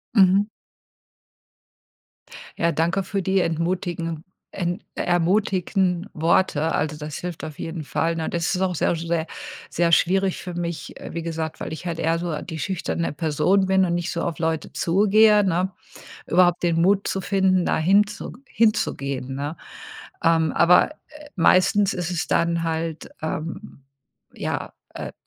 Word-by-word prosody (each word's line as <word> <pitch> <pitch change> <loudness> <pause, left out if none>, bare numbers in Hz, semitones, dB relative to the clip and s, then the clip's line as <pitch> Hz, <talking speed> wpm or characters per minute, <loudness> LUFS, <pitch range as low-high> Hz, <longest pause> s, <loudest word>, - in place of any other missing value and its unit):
Mhm. 195 0 +5 2.1
Ja, 170 0 +2
danke 170 +5 0
für 195 +1 -2
die 190 +1 +2
entmutigen 165 -1 -2 0.3
en 175 +2 -3
ermutigen 180 +1 +1
Worte. 160 -1 +2
Also, 150 0 -1
das 150 -1 -6
hilft 175 -3 -6
auf 155 -2 -7
jeden 165 -1 -5
Fall, 165 +3 -1
ne, 160 - -2
das 170 +2 -1
ist 185 - -1
auch 185 -2 0
sehr, 170 - +1
sehr, 165 0 -1 0.5
sehr 170 0 +1
schwierig 190 +3 +2
für 180 -2 -6
mich, 170 -1 -5
äh, - - -8
wie 170 -1 -4
gesagt, 160 -1 -4
weil 160 - -5
ich 175 +3 -7
halt 165 - -3
eher 165 0 +1
so 165 -3 -3
die 160 -3 -6
schüchterne 170 -2 -2
Person 165 +5 +2
bin 190 0 +3
und 175 -1 +1
nicht 175 0 -2
so 170 - -2
auf 170 -4 -2
Leute 160 -1 -2
zugehe, 210 +3 +4
ne? 185 +1 0 0.5
Überhaupt 175 0 +3
den 165 -1 +2
Mut 195 +2 +3
zu 190 - -1
finden, 185 -1 +2
da - - +1
hinzu 205 +6 +2
hinzugehen, 140 - 0
ne? 145 +4 -4 0.7
Ähm, 165 -2 +3
aber, 180 - +5
äh, 300 -1 -15
meistens 195 +3 +4
ist 175 0 -3
es 170 -2 -2
dann 170 0 +1
halt, 160 -1 -3
ähm, 160 0 -5 0.5
ja, - - -4 0.2
äh, - - -6
170 Hz, 150 wpm, -23 LUFS, 165-190 Hz, 2.1 s, Mhm